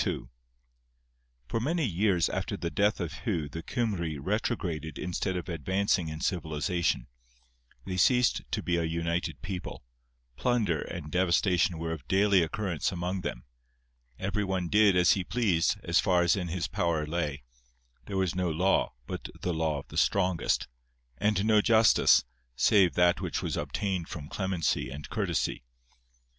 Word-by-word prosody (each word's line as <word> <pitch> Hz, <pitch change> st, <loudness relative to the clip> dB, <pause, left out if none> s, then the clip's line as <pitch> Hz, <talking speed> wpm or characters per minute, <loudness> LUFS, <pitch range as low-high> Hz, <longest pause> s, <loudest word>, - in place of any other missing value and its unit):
{21b} -, -, -3 dB, 1.2 s
For 115 Hz, -, -1 dB
many 155 Hz, +6 st, 0 dB
years 95 Hz, -3 st, +2 dB
after -, -, -3 dB
the 85 Hz, -, -3 dB
death 105 Hz, 0 st, +2 dB
of 85 Hz, -3 st, -3 dB
Hu 85 Hz, -11 st, -2 dB
the 80 Hz, +3 st, -6 dB
Cymry 90 Hz, -, -2 dB
retrograded 85 Hz, -, -2 dB
instead 90 Hz, +1 st, -2 dB
of 90 Hz, -, -5 dB
advancing 95 Hz, +2 st, 0 dB
in 80 Hz, 0 st, -6 dB
civilization; 85 Hz, -4 st, -1 dB, 0.8 s
they 95 Hz, -1 st, -3 dB
ceased 125 Hz, +6 st, +3 dB
to -, -, -2 dB
be 85 Hz, -1 st, +1 dB
a 85 Hz, -, 0 dB
united 85 Hz, -3 st, -2 dB
people; 95 Hz, -3 st, -6 dB, 0.5 s
plunder 110 Hz, -, +1 dB
and 75 Hz, -4 st, -7 dB
devastation 90 Hz, 0 st, +2 dB
were 80 Hz, 0 st, -3 dB
of 75 Hz, -5 st, -6 dB
daily 100 Hz, 0 st, +4 dB
occurrence 85 Hz, 0 st, -1 dB
among 90 Hz, +1 st, -3 dB
them; -, -, -5 dB, 0.7 s
every 100 Hz, +2 st, -1 dB
one 95 Hz, -3 st, -2 dB
did 105 Hz, -1 st, +5 dB
as 90 Hz, -1 st, +5 dB
he 95 Hz, -, +1 dB
pleased, 95 Hz, -5 st, +1 dB
as -, -, +2 dB
far 90 Hz, -2 st, +3 dB
as 85 Hz, 0 st, +3 dB
in 90 Hz, -3 st, -3 dB
his 85 Hz, +1 st, -2 dB
power 80 Hz, -3 st, 0 dB
lay; 75 Hz, -4 st, -3 dB, 0.6 s
there 100 Hz, -, -3 dB
was 95 Hz, -4 st, +1 dB
no 90 Hz, -1 st, 0 dB
law, 90 Hz, +5 st, +1 dB
but -, -, -6 dB
the 90 Hz, -, 0 dB
law 80 Hz, -2 st, 0 dB
of 70 Hz, -, -8 dB
the -, -, -8 dB
strongest; 95 Hz, -3 st, +1 dB, 0.5 s
and 105 Hz, -1 st, +1 dB
no 110 Hz, -1 st, +5 dB
justice, 110 Hz, -1 st, +5 dB, 0.3 s
save 90 Hz, +5 st, +4 dB
that 90 Hz, 0 st, +3 dB
which -, -, -3 dB
was -, -, -2 dB
obtained 95 Hz, -4 st, -2 dB
from 75 Hz, -2 st, -7 dB
clemency 95 Hz, -5 st, -1 dB
and 70 Hz, +1 st, -8 dB
courtesy. 100 Hz, -7 st, -1 dB
90 Hz, 155 wpm, -29 LUFS, 80-100 Hz, 1.2 s, did